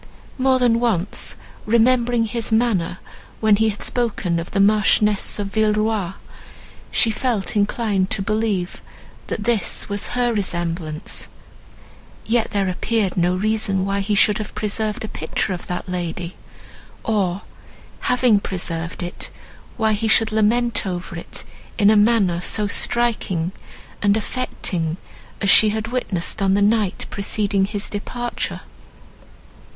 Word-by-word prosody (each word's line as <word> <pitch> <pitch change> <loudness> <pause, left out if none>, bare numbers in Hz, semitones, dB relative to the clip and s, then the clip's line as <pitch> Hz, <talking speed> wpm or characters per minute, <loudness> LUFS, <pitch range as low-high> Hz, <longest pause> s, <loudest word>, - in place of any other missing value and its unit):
More 260 0 +4
than 240 -2 +3
once 210 -6 +1 0.3
remembering 235 +1 +3
his 230 0 -3
manner, 220 -7 +1 0.4
when 215 -2 +4
he 220 +1 +3
had 210 -1 -2
spoken 205 -8 -1
of 165 - -6
the 200 - -1
Marchioness 210 0 +3
of 200 -1 -4
Villeroi, 215 -3 +1 0.8
she 225 - +3
felt 220 -3 -1
inclined 205 -2 +1
to 195 - 0
believe 215 -4 -1 0.5
that 210 - -3
this 225 -2 0
was 205 +4 -2
her 240 -1 +2
resemblance; 170 -5 -3 1.0
yet 230 0 +1
there 200 -2 0
appeared 200 +1 0
no 180 0 +2
reason 210 -1 0
why 195 0 -1
he 205 +1 0
should 210 +1 +4
have 215 - -6
preserved 215 +2 -2
a - - -5
picture 160 +2 -2
of 175 - -7
that 180 - -4
lady, 175 0 -4 0.7
or, 200 -4 0 0.6
having 250 -4 +3
preserved 170 -3 -4
it, 175 - -6 0.5
why 220 -2 +2
he 215 +2 0
should 220 0 +4
lament 220 +1 +1
over 180 0 -5
it 170 - -6 0.3
in 205 -1 +5
a - - +4
manner 205 -5 +3
so 210 +3 +1
striking 205 -6 0 0.5
and 205 +1 +3
affecting 180 -8 -2 0.4
as 200 - +2
she 215 - +7
had 220 +1 -2
witnessed 215 -5 -2
on 195 0 +3
the - - +2
night 210 -2 +1
preceding 200 -1 0
his 205 0 -3
departure. 240 +4 -4
210 Hz, 135 wpm, -21 LUFS, 190-225 Hz, 1.0 s, she